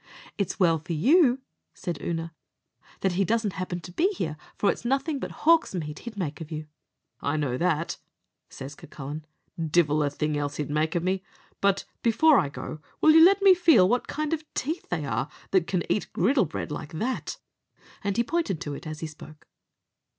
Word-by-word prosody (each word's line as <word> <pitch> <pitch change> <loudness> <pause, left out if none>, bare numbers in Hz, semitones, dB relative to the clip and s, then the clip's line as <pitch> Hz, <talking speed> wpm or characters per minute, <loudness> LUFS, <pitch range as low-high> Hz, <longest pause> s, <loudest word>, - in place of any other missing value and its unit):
"It's 200 -4 -2
well 165 -4 +4
for 165 +3 -5
you," 260 - +4 0.3
said 175 -6 -4
Oonagh, 165 -1 -3 0.7
"that 190 - +2
he 185 +3 +1
doesn't 220 0 0
happen 180 -1 -4
to 175 - -10
be 330 - +2
here, 160 - -3 0.2
for 205 - +3
it's - - -7
nothing 275 +4 0
but - - -4 0.2
hawk's 330 - +5
meat 150 -3 -4
he'd 235 -3 -9
make 160 -4 -3
of 160 0 -8
you." 155 0 -4 0.6
"I 145 +2 0
know 140 -5 0
that," 170 -2 0 0.5
says 135 +2 -8
Cucullin; 150 +3 -8 0.4
"divil 155 -1 +3
a 145 - +2
thing 150 +1 -2
else 145 0 -2
he'd 145 -1 -3
make 155 +2 0
of 170 - +1
me; 185 +1 0 0.4
but 200 -1 +2 0.2
before 270 +6 +5
I 140 - 0
go, 155 +2 -7 0.2
will 310 - +6
you 320 +1 +8
let 395 +3 +6
me 390 -1 +9
feel 325 - +5
what 245 +4 +1
kind 305 +1 -2
of 315 -1 -2
teeth 320 +6 -3
they 160 -4 -1
are 120 +2 -1 0.2
that 185 -3 +3
can 180 -3 0
eat 210 - -1
griddle 235 - +3
bread 160 0 -5
like 150 +1 -6
that?" 235 +11 -3 0.7
and 200 +1 -1
he 235 - +4
pointed 310 - -1
to 145 - -4
it 155 - -8
as 155 0 -6
he 160 - -2
spoke. 155 0 -13
175 Hz, 195 wpm, -27 LUFS, 155-240 Hz, 0.7 s, me